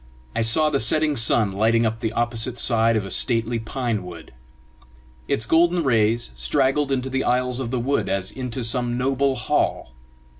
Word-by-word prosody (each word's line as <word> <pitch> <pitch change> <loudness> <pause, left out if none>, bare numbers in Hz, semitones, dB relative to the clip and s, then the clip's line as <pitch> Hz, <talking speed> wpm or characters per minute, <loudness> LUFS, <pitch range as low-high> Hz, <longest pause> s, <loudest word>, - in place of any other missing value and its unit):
I - - 0
saw 150 +8 +3
the 140 - +1
setting 150 +6 +2
sun 115 -3 +2
lighting 115 +4 +1
up 110 0 -2
the 110 -2 -2
opposite 120 +1 -2
side 115 -1 +2
of 105 -3 -1
a 95 - -6
stately 115 +1 +1
pine 115 -1 -3
wood. 85 -6 -11 0.9
Its 110 - 0
golden 170 +5 +2
rays 115 - +1
straggled 130 - 0
into 130 -1 -1
the 130 0 -1
aisles 125 0 0
of 130 -3 -4
the 125 0 -2
wood 135 +4 -1
as 95 -1 -1
into 125 -1 -5
some 120 +1 0
noble 135 +1 0
hall. 110 - -1
120 Hz, 175 wpm, -22 LUFS, 110-130 Hz, 0.9 s, saw